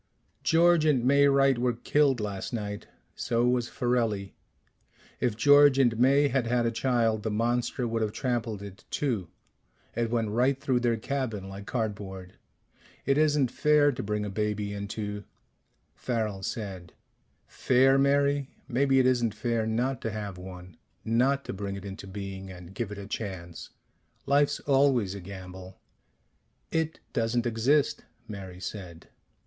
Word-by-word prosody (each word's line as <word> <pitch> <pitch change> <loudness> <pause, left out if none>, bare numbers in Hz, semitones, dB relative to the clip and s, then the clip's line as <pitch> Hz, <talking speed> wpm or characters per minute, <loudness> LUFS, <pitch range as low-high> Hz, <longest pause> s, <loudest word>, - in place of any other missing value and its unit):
"George 170 0 +4
and 140 -6 +2
May 140 +2 +5
Wright 135 -2 +4
were 125 0 +1
killed 135 +2 +2
last 100 +1 -4
night. 105 -2 -4 0.3
So 120 0 0
was 125 -1 +1
Farelli. 115 -5 -1 0.9
If 120 -4 0
George 145 +2 +6
and 120 -4 +3
May 140 +3 +5
had 130 -3 0
had 120 0 +1
a 115 - +1
child, 115 -2 +1
the 110 - -2
monster 120 +3 0
would 115 0 -1
have 110 -1 0
trampled 115 -5 -2
it 100 -1 -10
too 115 -11 -1 0.7
it 115 0 0
went 115 -2 0
right 130 +4 +2
through 130 -3 +1
their 120 -2 +1
cabin 115 -5 -3
like 100 +1 -9
cardboard. 100 -5 -4 0.7
It 140 +1 +2
isn't 145 -4 +3
fair 150 -1 +4
to 125 - -5
bring 105 0 -2
a 100 - -4
baby 105 0 -2
into 105 0 -5 0.4
" - - -45
Farrel 110 -5 -1
said, 95 -4 -5 0.5
"Fair, 135 +2 +3
Mary? 140 0 +2 0.2
Maybe 135 +2 +2
it 130 - +4
isn't 120 -4 +2
fair 115 0 -1
not 120 +3 -1
to 115 - -2
have 105 -3 -5
one. 90 -1 -10 0.3
Not 130 +5 +2
to - - -4
bring 100 0 -4
it 100 0 -8
into 100 0 -8
being 95 -1 -7
and 90 0 -11
give 110 0 -4
it 105 - -6
a 100 - -7
chance. 95 -5 -6 0.6
Life's 145 +1 +2
always 135 -8 +2
a 100 - -7
gamble 95 0 -10 0.5
" - - -44
"It 160 0 -6
doesn't 115 +1 0
exist," 120 +6 +1 0.2
Mary 95 -3 -8
said. 90 -4 -8
115 Hz, 155 wpm, -28 LUFS, 100-130 Hz, 0.9 s, George